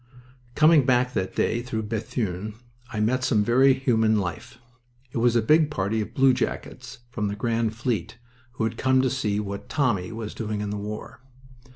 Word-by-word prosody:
Coming 155 -1 +6
back 125 -1 +2
that 95 -3 -2
day 115 +2 +1
through 115 -3 -4
Bethune 105 -2 -3 0.4
I 110 - -3
met 125 +4 +1
some 110 -5 +2
very 130 +4 +5
human 115 -5 +2
life. 90 +2 -4 0.5
It 120 - -2
was 120 0 +3
a 115 - +3
big 155 +5 +4
party 110 -4 -1
of 105 - -7
bluejackets 130 -1 0
from 105 -3 -2
the 100 - -3
Grand 115 0 -1
Fleet, 115 -4 -2 0.4
who 110 - -3
had 110 0 -2
come 130 0 +3
to 130 - +1
see 105 -6 -1
what 100 -1 -6
"Tommy" 115 - 0
was 110 -1 -6
doing 105 -2 -4
in 105 -1 -3
the - - -3
war. 105 +4 -7
115 Hz, 180 wpm, -25 LUFS, 105-130 Hz, 0.5 s, Coming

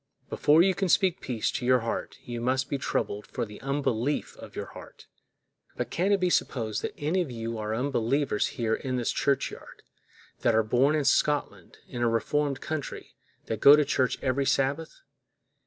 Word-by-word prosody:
Before 155 +3 +5
you 190 0 +3
can 195 -1 -1
speak 190 0 +3
peace 120 -4 -1
to - - -4
your 125 0 +4
heart, 115 - -4
you 120 -1 -5
must 130 +2 0
be 140 - -1
troubled 105 -5 -2
for - - -3
the 105 -1 -12
unbelief 135 -1 -1
of - - -12
your - - -4
heart. - - -13 0.7
But - - -3
can 185 +4 +1
it 200 - +3
be 180 -1 +1
supposed 110 -9 0
that - - -5
any 160 +6 0
of 170 - -3
you 115 -1 -5
are 110 +1 -2
unbelievers 130 -1 0
here 115 -2 0
in 130 +2 -2
this 120 -2 0
churchyard, 140 -1 -2 0.6
that 115 - +2
are 110 - +4
born 130 +7 +2
in 150 -2 0
Scotland, 145 +2 0
in 120 - -6
a 120 - +3
reformed 140 +4 0
country, 155 -3 -5 0.3
that 110 -2 -4
go 140 - +10
to 150 -1 +2
church 130 -2 +1
every 135 +1 0
Sabbath? 140 +4 0
135 Hz, 185 wpm, -27 LUFS, 115-150 Hz, 0.7 s, go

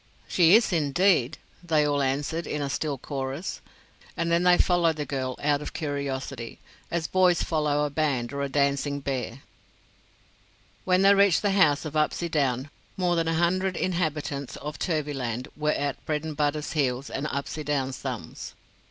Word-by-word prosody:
"She 175 +1 +5
is, 220 -4 +4
indeed," 160 -2 +2 0.3
they 155 -3 +2
all 145 -1 +1
answered, 145 +5 -1
in 150 - -2
a 140 -1 -2
still 145 0 -2
chorus, 135 +4 -4 0.6
and 170 0 0
then 170 +1 +3
they 180 0 +5
followed 170 -3 +3
the 150 -1 -3
girl 130 -3 -3
out 145 0 +2
of - - -6
curiosity, 140 -5 -4 0.3
as 170 -1 -1
boys 180 -1 +3
follow 150 -2 +1
a 145 - -3
band 140 -5 -1
or 140 - -3
a 140 - -1
dancing 140 +1 +1
bear. 135 -2 -4 1.4
When 185 0 +3
they 200 +1 +7
reached 200 -2 +4
the 205 - +2
house 160 -7 +3
of 155 - -5
Upsydoun 145 -4 0 0.3
more 180 -2 +1
than 165 -1 0
a 165 - +1
hundred 185 +2 +1
inhabitants 155 -6 -2
of 150 0 -7
Turvyland 135 - -2
were 150 0 -1
at 145 -1 -3
Bredenbutta's 150 -1 -1
heels 135 -3 -1
and 140 +3 -2
Upsydoun's 140 -1 -2
thumbs. - - -6
150 Hz, 155 wpm, -26 LUFS, 140-170 Hz, 1.4 s, they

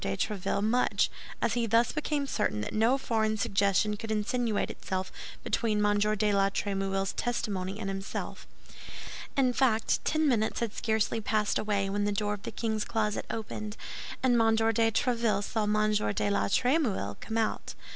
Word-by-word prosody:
de 100 0 -1
Tréville 200 0 -1
much, 240 +4 +2 0.3
as 220 - +2
he 235 -1 0
thus 230 +2 +3
became 300 -1 -1
certain 210 - -1
that 105 - -4
no 230 +5 +3
foreign 220 -4 0
suggestion 200 +1 +2
could 225 +2 -7
insinuate 220 +1 0
itself 190 -1 -4 0.3
between 210 -2 +1
M. 205 0 +3
de 210 0 +2
la 195 0 +3
Trémouille's 195 -1 -1
testimony 200 -5 -2
and 210 - -4
himself. 195 +1 -5 0.9
In 255 -2 +3
fact, 235 -4 +2
ten 310 0 +2
minutes 220 -5 +1
had 230 -3 -2
scarcely 220 0 0
passed 210 0 +1
away 205 -2 0
when 205 +1 0
the 205 - +1
door 205 0 0
of 205 - -6
the - - -5
king's 220 -2 -1
closet 215 -2 -1
opened, 215 -1 -5 0.5
and 245 -3 +4
M. 225 0 +4
de 225 - +1 0.3
Tréville 230 -3 +1
saw 220 +1 -1
M. 215 0 +2 0.2
de 205 - +1
la 200 - +2
Trémouille 235 - +1
come 220 - -4
out. 225 -1 -1
215 Hz, 165 wpm, -29 LUFS, 200-230 Hz, 0.9 s, and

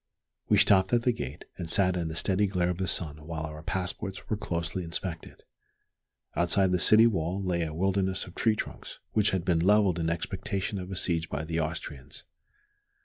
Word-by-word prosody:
We - - +5
stopped 95 +1 +4
at 120 -1 +3
the 125 - +3
gate, 80 - -6
and 85 -2 -4
sat 90 0 +3
in 85 -2 -1
the 80 - -5
steady 95 +4 +2
glare 90 -2 0
of 90 - -5
the 95 - -1
sun 75 -3 -2
while 80 -1 -4
our 75 -1 -6
passports 95 +4 -4
were - - +3
closely 85 -2 -3
inspected. 85 0 -6 0.9
Outside 90 +2 +3
the 90 - +2
city 110 +5 +7
wall 95 -3 0
lay 90 -2 0
a 80 -2 -2
wilderness 95 +3 0
of 90 - -12
tree 110 +2 +2
trunks, - - -6
which 105 -1 +3
had 95 -2 -1
been 85 -3 +2
levelled 95 -1 +3
in 80 0 0
expectation 95 +3 -3
of 90 0 -7
a 95 - -4
siege 85 -3 0
by 70 +2 -3
the 80 +1 -2
Austrians. 75 -3 -5
90 Hz, 195 wpm, -28 LUFS, 80-95 Hz, 0.9 s, city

